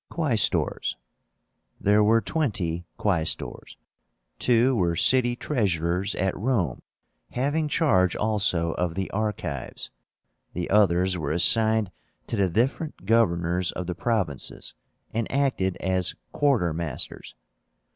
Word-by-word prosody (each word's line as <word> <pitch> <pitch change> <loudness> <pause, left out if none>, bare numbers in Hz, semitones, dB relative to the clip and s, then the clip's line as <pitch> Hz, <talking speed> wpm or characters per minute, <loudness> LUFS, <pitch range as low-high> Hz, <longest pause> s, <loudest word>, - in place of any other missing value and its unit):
QUAESTORS. 140 -11 0 0.8
There 105 +1 +4
were 115 +2 +4
twenty 90 - -2
Quaestors. 90 -6 -2 0.6
Two 125 +2 +3
were 85 -5 +1
city 120 +6 +3
treasurers 95 - -1
at 95 0 0
Rome, 100 - -1 0.5
having 145 +5 0
charge 115 - +2
also 100 -6 +1
of 85 0 -2
the 95 0 -3
archives. 95 - -4 0.6
The 90 0 -4
others 95 -3 +3
were 75 -2 -2
assigned 110 +4 +3 0.3
to - - -3
the 100 -3 +2
different 125 - -1
governors 90 -5 +2
of 90 - -4
the 90 - -3
provinces, 95 - -3 0.4
and 115 0 -2
acted 130 -9 0
as 95 0 0 0.2
quartermasters. 85 - -1
95 Hz, 105 wpm, -25 LUFS, 85-115 Hz, 0.8 s, There